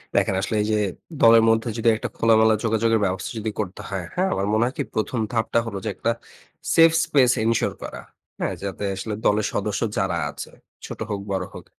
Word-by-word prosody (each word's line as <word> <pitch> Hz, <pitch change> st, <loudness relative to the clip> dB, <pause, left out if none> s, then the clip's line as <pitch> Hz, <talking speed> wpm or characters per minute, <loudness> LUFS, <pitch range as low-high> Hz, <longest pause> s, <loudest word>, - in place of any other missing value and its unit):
দেখেন, 95 Hz, -, +2 dB
আসলে 110 Hz, -, -2 dB
এইযে 110 Hz, 0 st, +1 dB, 0.5 s
দলের 115 Hz, 0 st, +8 dB
মধ্যে 115 Hz, +1 st, +2 dB
যদি 115 Hz, +1 st, +3 dB
একটা -, -, -4 dB
খোলামেলা 110 Hz, -1 st, +4 dB
যোগাযোগের 115 Hz, 0 st, +2 dB
ব্যবস্থা 95 Hz, 0 st, -2 dB
যদি 110 Hz, 0 st, -3 dB
করতে 100 Hz, -3 st, -4 dB
হয়, 95 Hz, -3 st, -3 dB
হ্যাঁ? 185 Hz, +2 st, +1 dB
আমার 100 Hz, -, -1 dB
মনে 110 Hz, +2 st, +3 dB
হয় 125 Hz, -, -2 dB
কি? -, -, 0 dB
১ম 110 Hz, +3 st, -1 dB
ধাপটা 115 Hz, 0 st, +1 dB
হলো 105 Hz, -4 st, -5 dB
যে -, -, 0 dB
একটা 115 Hz, -, 0 dB, 0.6 s
safe 165 Hz, 0 st, +6 dB
space 135 Hz, -6 st, +4 dB
ensure 115 Hz, 0 st, +1 dB
করা। -, -, -7 dB, 0.4 s
হ্যা? -, -, 0 dB
যাতে 100 Hz, +1 st, -4 dB
আসলে 105 Hz, +3 st, -4 dB
দলের 105 Hz, 0 st, +3 dB
সদস্য 105 Hz, 0 st, -2 dB, 0.2 s
যারা 95 Hz, -3 st, 0 dB
আছে, -, -, -8 dB, 0.3 s
ছোট -, -, -8 dB
হোক, 100 Hz, -, -2 dB
বড় 95 Hz, -1 st, -1 dB
হোক। -, -, -10 dB
110 Hz, 195 wpm, -23 LUFS, 100-115 Hz, 0.6 s, দলের